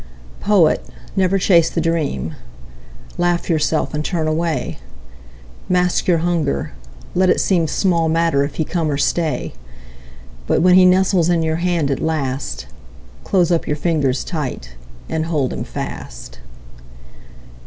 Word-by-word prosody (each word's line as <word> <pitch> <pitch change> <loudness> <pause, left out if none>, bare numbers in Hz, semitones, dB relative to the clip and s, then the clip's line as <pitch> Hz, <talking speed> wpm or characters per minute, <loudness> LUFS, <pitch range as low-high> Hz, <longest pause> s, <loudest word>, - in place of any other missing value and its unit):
Poet, 195 -7 +3 0.3
never 190 0 +2
chase 170 -4 +4
the - - -2
dream. 160 - -1 0.9
Laugh 175 0 0
yourself 155 0 0
and 150 0 -2
turn 160 -2 -1
away. 160 +1 -2 0.9
Mask 180 -1 +1
your 175 -2 +4
hunger; 160 - -1 0.4
let 185 +1 +3
it - - +3
seem 170 -4 +2
Small 170 -1 +1
matter 165 -3 +2
if 140 0 -5
he 160 - -1
come 165 -2 -1
or 140 - -1
stay; 150 - -1 0.9
But - - +2
when 180 0 +6
he 185 0 +7
nestles 185 -2 +3
in 170 -2 +2
your 160 0 0
hand 170 -4 0
at 135 - -1
last, 140 -4 -2 0.6
Close 180 -3 +2
up 170 - +1
your 150 - -1
fingers 145 -5 0
tight 130 - -5 0.3
and 160 0 -2
hold 150 -6 0
him - - -4
fast. - - -7
165 Hz, 140 wpm, -19 LUFS, 150-175 Hz, 0.9 s, he